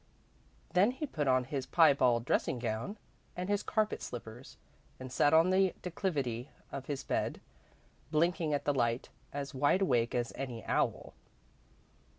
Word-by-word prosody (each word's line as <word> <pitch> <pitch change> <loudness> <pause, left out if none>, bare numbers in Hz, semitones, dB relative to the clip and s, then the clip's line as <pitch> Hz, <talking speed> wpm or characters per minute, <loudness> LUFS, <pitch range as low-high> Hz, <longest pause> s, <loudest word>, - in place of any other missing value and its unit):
Then 185 +5 +5
he 260 +5 -3
put 150 - -2
on 130 -1 +4
his 130 0 -4
piebald 130 -8 +4
dressing 135 - +1
gown 115 - -3 0.4
and 180 +2 -3
his 205 0 +1
carpet 215 -1 0
slippers, 120 +1 -8 0.4
and 130 -1 -7
sat 145 +3 +3
on 165 +3 +5
the 190 0 +3
declivity 145 - -2 0.2
of 135 -1 -6
his 140 -2 -3
bed, - - -1 0.7
blinking 165 +1 +1
at 145 -1 -1
the 145 - +2
light, 120 -2 0 0.2
as 140 -1 -5
wide 145 +8 +3
awake 120 -9 +1
as 120 -1 -1
any 125 -4 -5
owl. - - 0
140 Hz, 150 wpm, -32 LUFS, 125-175 Hz, 0.7 s, Then